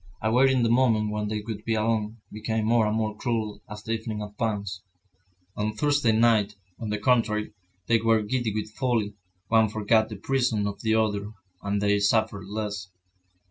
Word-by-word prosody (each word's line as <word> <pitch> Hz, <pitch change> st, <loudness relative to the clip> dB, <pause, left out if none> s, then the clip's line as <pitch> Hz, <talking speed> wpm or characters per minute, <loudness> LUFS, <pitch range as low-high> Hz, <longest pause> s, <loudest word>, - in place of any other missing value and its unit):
Awaiting 125 Hz, +3 st, +3 dB
the 115 Hz, -, +2 dB
moment 115 Hz, -3 st, +3 dB
when 105 Hz, 0 st, -2 dB
they 105 Hz, 0 st, -2 dB
would 105 Hz, -1 st, -6 dB
be 115 Hz, 0 st, 0 dB
alone, 110 Hz, 0 st, 0 dB
became 110 Hz, 0 st, -2 dB
more 115 Hz, -1 st, +3 dB
and 105 Hz, +1 st, 0 dB
more 110 Hz, -1 st, -1 dB
cruel 110 Hz, -3 st, -2 dB
as 105 Hz, 0 st, -8 dB
the 115 Hz, -, -4 dB
evening 110 Hz, -1 st, -3 dB
advanced. 105 Hz, -2 st, -3 dB, 0.7 s
On 105 Hz, +1 st, -1 dB
Thursday 145 Hz, -1 st, +2 dB
night, 110 Hz, -2 st, +3 dB, 0.2 s
on 110 Hz, -, -4 dB
the 105 Hz, -, -1 dB
contrary, 105 Hz, -2 st, +1 dB, 0.3 s
they 115 Hz, +2 st, +3 dB
were 115 Hz, -1 st, +3 dB
giddy 120 Hz, +1 st, -1 dB
with 110 Hz, +1 st, -4 dB
folly, 115 Hz, -4 st, 0 dB, 0.4 s
one 110 Hz, -1 st, +4 dB
forgot 110 Hz, +1 st, +2 dB
the 110 Hz, -, -6 dB
presence 120 Hz, -1 st, 0 dB
of 100 Hz, 0 st, -5 dB
the 110 Hz, 0 st, +2 dB
other, 105 Hz, -1 st, 0 dB, 0.3 s
and 100 Hz, 0 st, -1 dB
they 100 Hz, 0 st, +3 dB
suffered 100 Hz, -1 st, +1 dB
less. 105 Hz, -2 st, -4 dB
110 Hz, 175 wpm, -26 LUFS, 105-115 Hz, 0.7 s, one